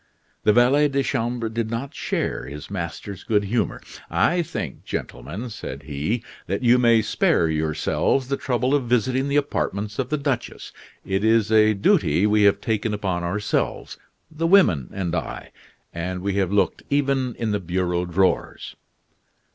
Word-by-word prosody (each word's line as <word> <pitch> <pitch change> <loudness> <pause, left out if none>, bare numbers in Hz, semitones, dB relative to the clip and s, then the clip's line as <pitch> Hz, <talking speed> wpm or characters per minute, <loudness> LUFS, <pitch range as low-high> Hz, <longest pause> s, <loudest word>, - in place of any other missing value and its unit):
The - - +6
valet 130 +6 +4
de 140 -1 0
chambre 120 -3 -1
did 110 0 -3
not 115 +4 -4
share - - -2
his 75 +6 -9
master's 95 +1 -5
good 105 -2 +1
humor. 110 +2 -1 0.3
"I 175 0 +2
think, 165 - -5
gentlemen," 85 - -5
said 110 - -7
he, 75 - -2 0.2
"that - - -2
you 125 +1 +5
may 115 -2 +4
spare 85 - +2
yourselves 80 - 0
the 140 - 0
trouble 125 0 0
of 140 -3 +2
visiting 125 +3 +1
the 140 - -1
apartments 105 -7 -1
of - - -1
the 150 - 0
duchess. 140 -4 -3 0.3
It 95 +1 -1
is 110 -1 +3
a 110 -1 +5
duty 95 -2 +3
we 105 0 +3
have 100 - +4
taken 110 -2 -1
upon 95 -4 -2
ourselves 100 +5 -2 0.3
the 160 +1 -1
women 165 - +4
and 90 -3 -3
I 80 - -4 0.4
and 90 +2 -4
we 100 0 0
have 95 -2 +1
looked 100 - +1
even 135 -3 +1
in 115 -2 -2
the 105 - 0
bureau 90 -1 -1
drawers." 95 +2 0
110 Hz, 160 wpm, -23 LUFS, 95-125 Hz, 0.4 s, The